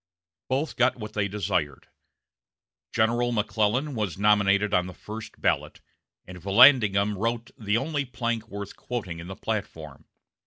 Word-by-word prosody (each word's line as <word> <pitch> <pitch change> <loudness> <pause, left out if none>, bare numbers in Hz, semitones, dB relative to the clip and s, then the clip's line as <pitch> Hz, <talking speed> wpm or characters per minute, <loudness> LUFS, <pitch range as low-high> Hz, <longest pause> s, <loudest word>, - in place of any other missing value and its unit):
Both 140 +4 -1
got 125 +1 +3
what 110 -2 -8
they 105 -1 0
desired. 95 -9 -2 1.0
General 120 +2 +1
McClellan 110 +5 0
was 105 -8 -3
nominated 100 0 +3
on 90 0 +2
the 90 - -9
first 110 +1 -9
ballot, - - -1 0.5
and 90 -1 -11
Vallandigham 105 - +5
wrote 115 +3 -2
the 105 0 0
only 145 +2 -2
plank 115 -2 -3
worth 100 -2 -7
quoting 100 -9 -5
in 85 - -8
the 95 - -7
platform. 80 -11 -5
105 Hz, 140 wpm, -26 LUFS, 100-120 Hz, 1.0 s, Vallandigham